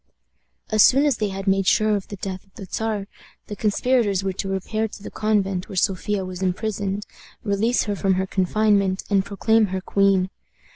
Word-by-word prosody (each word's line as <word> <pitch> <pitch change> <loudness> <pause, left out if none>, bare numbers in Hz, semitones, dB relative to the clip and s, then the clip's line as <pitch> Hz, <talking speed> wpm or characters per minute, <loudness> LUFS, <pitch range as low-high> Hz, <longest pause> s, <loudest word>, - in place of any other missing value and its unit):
As 215 -1 +4
soon 270 +6 +6
as 280 -6 +2
they 210 - 0
had 195 0 -5
made 195 -1 +2
sure 215 +1 +3
of 200 - -4
the 205 - -7
death 190 -1 -6
of 195 - -32
the 200 - -8
Czar, 215 +1 -2 0.4
the 210 - -7
conspirators 210 -1 +1
were 190 -1 -1
to 195 +1 -4
repair 215 +3 -1
to 210 -1 -12
the - - -7
convent 195 -4 0
where - - -7
Sophia 195 +2 0
was 185 0 -7
imprisoned, 200 +1 -2 0.4
release 220 +4 +1
her 205 -2 -2
from 195 -1 +1
her 190 +1 0
confinement, 195 0 +1
and 195 -1 +3
proclaim 215 +2 +2
her 190 0 -3
queen. 195 -1 +2
200 Hz, 190 wpm, -23 LUFS, 190-215 Hz, 0.4 s, soon